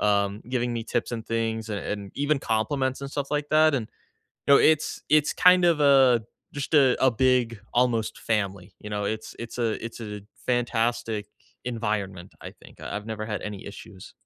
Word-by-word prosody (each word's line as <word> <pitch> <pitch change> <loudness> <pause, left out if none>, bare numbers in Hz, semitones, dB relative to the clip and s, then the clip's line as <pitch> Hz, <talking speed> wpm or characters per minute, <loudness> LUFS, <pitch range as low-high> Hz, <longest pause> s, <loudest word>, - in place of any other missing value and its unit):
um, 100 0 +1
giving 120 -1 -1
me 115 -1 -3
tips 120 0 -2
and 115 -2 -4
things 115 -1 -2
and 105 - -2
and 100 -2 -5
even 145 +1 +1
compliments 130 +4 -1
and 140 - -5
stuff 140 -1 -4
like 145 0 -1
that, 155 -1 +5
and 110 -5 -2 0.6
No, 140 - +8
it's 155 -1 +2
it's 150 -1 +4
kind 180 0 +6
of 170 -3 +3
a 135 -5 +5 0.3
just 145 +2 -5
a 135 -4 +5
a 130 - +6
big 120 -1 +2 0.2
almost 120 -3 +1
family, 100 -3 -2
you 105 - -8
know, 105 -1 -2
it's 110 +2 -4
it's 115 +1 -7
a 115 -2 -1
it's 115 - -7
a 105 -2 -6 0.2
fantastic 115 -3 0 0.4
environment, 105 -6 -3
I - - -8
think, - - -16
I - - -5
I've 105 - -6
never 110 -1 -4
had 105 -2 -4
any 105 -2 -7
issues. 100 -1 -11
115 Hz, 185 wpm, -26 LUFS, 105-130 Hz, 0.6 s, No